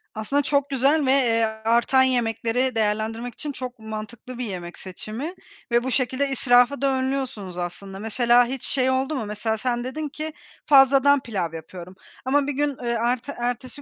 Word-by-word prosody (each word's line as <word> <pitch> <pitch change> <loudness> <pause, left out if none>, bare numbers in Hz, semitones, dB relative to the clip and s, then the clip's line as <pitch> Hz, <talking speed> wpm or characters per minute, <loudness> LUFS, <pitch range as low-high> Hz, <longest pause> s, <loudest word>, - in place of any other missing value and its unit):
Aslında, 275 +7 0
çok 280 0 +1
güzel 275 +3 +2
ve, 260 - +3
eee, 235 -4 +3 0.2
artan 240 +3 +4
yemekleri 245 0 0
değerlendirmek 220 +2 -1
için 295 +4 -5
çok 255 -3 -7
mantıklı 220 +3 -7
bir 250 - -3
yemek 175 -4 -7
seçimi 220 - -6 0.4
ve 240 +1 +3
bu 260 - -2
şekilde 260 +2 0
israfı 250 +1 +3
da 275 -1 +2
önlüyorsunuz, 260 -9 -3
aslında. 190 +2 -6
Mesela 240 +2 +3
hiç 260 +1 -5
şey 260 -2 +1
oldu 265 +3 0
mu? 225 -5 -3
Mesela 215 +1 -2
sen 240 +1 -1
dedin 295 +4 -4
ki 310 +1 -6 0.3
fazladan 275 0 +6
pilav 185 -9 -3
yapıyorum. 175 +3 -9 0.3
Ama 285 +2 +2
1 290 - -1
gün, 285 -1 -1
eee, 240 - -2
erte 240 +4 -1
ertesi 245 +3 -4
245 Hz, 170 wpm, -24 LUFS, 220-270 Hz, 0.4 s, fazladan